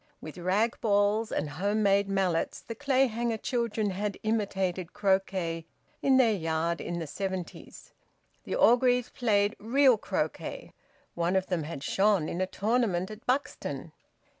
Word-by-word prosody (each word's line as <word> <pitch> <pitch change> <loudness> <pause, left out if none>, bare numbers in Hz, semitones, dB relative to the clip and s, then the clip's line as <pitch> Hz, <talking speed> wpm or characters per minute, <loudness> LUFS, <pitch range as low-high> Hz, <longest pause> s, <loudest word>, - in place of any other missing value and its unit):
With 155 +3 -9
rag 200 +6 0
balls 210 +1 +2
and 150 - -1
home 200 +8 -1
made 200 0 +3
mallets 190 -4 0
the 230 - -7
Clayhanger 240 -3 +1
children 225 -3 -1
had 200 +1 -3
imitated 190 -5 -1
croquet 190 -4 0 0.3
in 265 -1 +4
their 235 -4 +5
yard 165 -2 -1
in 175 - -4
the 165 - -3
seventies. 190 +2 -6 0.5
The - - -3
Orgreaves 245 0 +4
played 210 -3 +1
real 255 +1 +4
croquet; - - -4 0.4
one 170 +2 0
of 190 -1 +2
them 175 -5 -2
had 145 -3 -6
shone 195 -4 +2
in 175 - -3
a 185 - +1
tournament 205 -4 0
at 215 +2 -10
Buxton. 265 +3 -2
200 Hz, 140 wpm, -29 LUFS, 180-225 Hz, 0.5 s, their